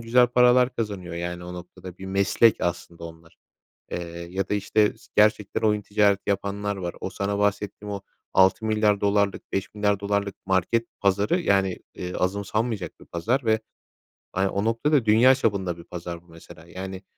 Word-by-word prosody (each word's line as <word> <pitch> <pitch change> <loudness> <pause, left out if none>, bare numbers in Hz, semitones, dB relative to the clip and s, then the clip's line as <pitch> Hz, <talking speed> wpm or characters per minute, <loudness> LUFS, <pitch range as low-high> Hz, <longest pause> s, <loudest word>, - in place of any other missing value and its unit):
güzel 120 +2 +4
paralar 125 +1 +4
kazanıyor, 100 -6 -4
yani, 85 +1 -4
o 90 0 -7
noktada. 90 +1 -10
Bir 95 - -8
meslek 100 +4 +3
aslında 85 -1 -3
onlar. 80 0 -12 0.5
Eee, - - -2 0.3
ya 95 +1 -2
da, - - 0
işte, 105 +1 +2
s - - -20
gerçekten 105 -1 +3
oyun 105 -1 +2
ticareti 100 -1 +2
yapanlar 100 +1 -2
var. 90 -3 -4
O 95 - -4
sana 100 +1 -2
bahsettiğim 105 0 -1
o, 100 - -4 0.3
6 95 +4 +4
milyar 105 -2 +2
dolarlık, 100 0 0
5 95 +2 -3
milyar 105 -1 +1
dolarlık 100 -1 -1
market 95 +5 +1
pazarı, 100 - +2
yani, 95 - +1 0.2
eee, 90 0 -6
azımsanmayacak 100 +1 -2
bir - - -13
pazar 115 +11 0
ve, 110 -1 +2 0.7
hani, 95 +1 +1
o 100 +1 -2
noktada 115 +3 +2
dünya 120 +5 +6
çapında 95 -7 -1
bir 85 - -11
pazar 85 -1 -7
bu, - - -28
mesela. 80 0 -14
Yani, 95 +1 -7
100 Hz, 170 wpm, -25 LUFS, 95-110 Hz, 0.7 s, dünya